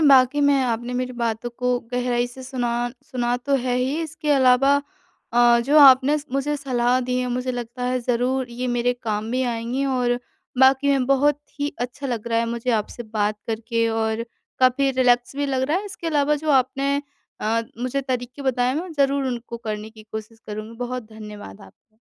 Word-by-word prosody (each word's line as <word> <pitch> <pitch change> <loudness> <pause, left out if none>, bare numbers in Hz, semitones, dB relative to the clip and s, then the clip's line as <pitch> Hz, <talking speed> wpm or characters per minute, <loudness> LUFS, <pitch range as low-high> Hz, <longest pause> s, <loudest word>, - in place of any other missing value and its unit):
बाकी 275 -1 +5
मैं 285 -1 +4
आपने 240 0 -2
मेरी 255 0 -2
बातों 235 0 -2
को 250 -1 +1
गहराई 245 -1 0
से 245 +2 -11
सुना 255 -2 -2 0.3
सुना 245 -4 -1
तो 275 +3 -1
है 250 -1 0
ही, 265 +5 0
इसके 310 -1 -4
अलावा 270 0 +5 0.6
अ, 240 0 +5
जो 280 +6 +4
आपने 275 +1 +7
स 290 - -10
मुझे 280 +2 0
सलाह 250 -3 +1
दी 250 0 +1
है, 250 - -1
मुझे 250 +1 -2
लगता 245 0 -5
है 255 0 0
ज़रूर 250 +1 0
ये 245 +2 -4
मेरे 245 +1 +2
काम 215 -2 -2
में 260 - +1
आएँगी। 240 +3 -2
और 245 -2 +1 0.4
बाकी 265 +2 +5
में 270 -2 +2
बहुत 275 +2 +3 0.2
ही 285 0 0
अच्छा 250 +3 -4
लग 235 -3 -3
रहा 230 -1 +2
है 230 - +1
मुझे 235 +1 -2
आपसे 220 +2 -2
बात 215 -1 -1
करके 230 +1 -1
और 225 0 -1 0.3
काफ़ी 260 +2 +3
रिलैक्स 250 0 +2
भी 285 - 0
लग 265 -1 0
रहा 310 - +2
है। 405 - -6
इसके 360 -3 -7
अलावा 300 -2 +2
जो 310 +1 -2
आपने 270 +1 +2 0.5
अ, 225 +2 +1 0.2
मुझे 255 +3 -1
तरीके 255 0 -4
बताए, 255 -1 +1
मैं 345 +3 -4
ज़रूर 280 -2 +1
उनको 240 -2 -4
करने 215 -2 -5
की 220 -1 -14
कोशिश 220 +1 -7
करुँगी। 215 +2 -7
बहुत 245 -2 -5
धन्यवाद 210 - -10
आपका। 215 - -19
250 Hz, 190 wpm, -23 LUFS, 235-275 Hz, 0.6 s, आपने